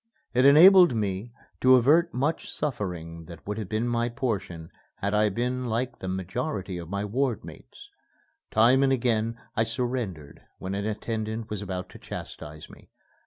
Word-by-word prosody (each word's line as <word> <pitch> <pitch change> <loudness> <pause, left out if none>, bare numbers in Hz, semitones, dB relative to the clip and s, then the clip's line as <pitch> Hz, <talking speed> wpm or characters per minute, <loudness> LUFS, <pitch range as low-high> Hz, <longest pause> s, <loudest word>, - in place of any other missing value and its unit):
It 125 +1 +3
enabled 175 +1 +8
me 105 +1 -2 0.3
to 130 0 +6
avert 155 +8 +4
much 145 +5 -2
suffering 85 - -4
that 85 0 -12
would 105 +2 -4
have 105 -4 -5
been 110 +2 -1
my 120 0 0
portion 100 -10 -4 0.2
had 100 +1 -2
I 105 0 +3
been 125 +5 -2
like 120 +2 -2
the 95 - -6
majority 95 - -3
of 85 -1 -8
my 100 +1 -2
ward 120 +1 -1
mates. - - -13 0.6
Time 120 +5 +4
and 135 -1 +3
again 115 -2 0 0.2
I - - +2
surrendered 115 - -4 0.2
when 95 +1 -5
an 100 +1 -2
attendant 110 0 -4
was 105 -2 -3
about 90 -2 -4
to - - -13
chastise 75 +1 -8
me. - - -17
110 Hz, 165 wpm, -26 LUFS, 95-125 Hz, 0.6 s, enabled